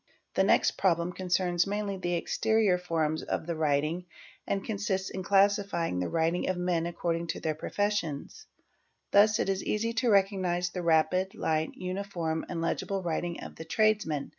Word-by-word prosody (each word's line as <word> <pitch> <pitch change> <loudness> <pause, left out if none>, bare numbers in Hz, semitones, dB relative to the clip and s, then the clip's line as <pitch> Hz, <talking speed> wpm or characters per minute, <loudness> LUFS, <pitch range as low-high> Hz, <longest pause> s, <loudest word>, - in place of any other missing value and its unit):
The - - +3
next - - +3
problem 175 -1 +2
concerns 180 -1 +1
mainly 205 0 -2
the 175 -2 -2
exterior 215 +1 +2
form 160 -3 -1
of - - -1
the 170 0 -3
writing 155 +3 0 0.4
and 195 -1 -1
consists 195 -3 -2
in 190 - -4
classifying 195 - +2
the 90 - -1
writing 165 +2 0
of 185 - 0
men 175 -2 0
according 170 0 -2
to - - -3
their 155 - -1
profes 205 +6 -1
ions: 160 - -8 0.6
thus 210 +1 +5
it - - 0
is 195 -1 -1
easy 230 +2 -1
to 245 - +2
recognise 190 -3 +2
the 180 - -4
rapid, 170 +3 +2
light, 155 0 -1
uniform, 180 -4 -3
and 165 - -3
legible 190 +3 -2
riting 170 0 -2
of - - -9
the - - -6
tradesman. 205 -6 +1
180 Hz, 165 wpm, -29 LUFS, 165-200 Hz, 0.6 s, thus